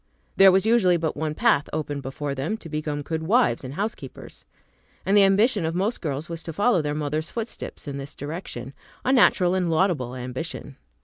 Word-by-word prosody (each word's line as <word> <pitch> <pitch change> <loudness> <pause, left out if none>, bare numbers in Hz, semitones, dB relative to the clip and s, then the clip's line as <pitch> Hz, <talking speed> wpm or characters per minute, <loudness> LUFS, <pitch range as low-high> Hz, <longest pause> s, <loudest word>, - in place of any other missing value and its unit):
There 195 0 +8
was 190 +1 +3
usually 215 -6 +4
but 160 -1 -2
one 155 0 -3
path 215 -10 +2
open 145 -2 -3
before 140 +2 -4
them, 145 +11 -2
to 165 - -11
become 150 -1 -3
good 160 +2 -3
wives 195 - +2
and 130 +2 -7
housekeepers. 210 +5 -6 0.6
And 195 - +2
the 205 - +7
ambition 200 +1 +3
of 160 +1 -2
most 200 +6 -1
girls 150 -1 -3
was 165 -1 -6
to 165 - -7
follow 205 +1 +3
their 150 0 -2
mothers' 155 +1 -2
footsteps 230 -8 -6
in 140 -1 -4
this 140 +1 -8
direction; 145 -4 -6 0.3
a 260 - +3
natural 185 -8 +4
and 185 -2 0
laudable 160 -7 +1
ambition. 130 +2 -6
160 Hz, 190 wpm, -24 LUFS, 145-195 Hz, 0.6 s, There